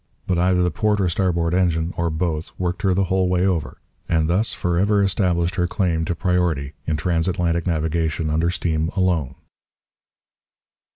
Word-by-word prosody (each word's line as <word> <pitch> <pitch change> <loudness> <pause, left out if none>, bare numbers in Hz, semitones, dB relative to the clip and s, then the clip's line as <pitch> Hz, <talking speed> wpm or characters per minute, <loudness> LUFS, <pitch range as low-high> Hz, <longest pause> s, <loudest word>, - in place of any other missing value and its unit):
But 90 -2 0
either 90 0 +3
the 90 - +1
port 105 +2 0
or 95 - +2
starboard 85 -1 0
engine, 85 -2 +1
or 85 0 0
both, 80 0 -2
worked 90 -1 -2
her 95 - +2
the 95 - +2
whole 95 0 +1
way 90 0 +2
over, 80 -9 -1 0.3
and 80 -2 +2
thus 95 +7 +1
for 85 -1 -1
ever 100 +1 +3
established 90 -3 +1
her 90 -1 +1
claim 85 -3 0
to 85 0 -2
priority 85 -6 0
in 80 -1 0
transatlantic 85 +1 0
navigation 80 -1 -1
under 80 +2 +1
steam 80 -2 -1
alone. 85 -8 0
85 Hz, 165 wpm, -22 LUFS, 80-90 Hz, 0.3 s, either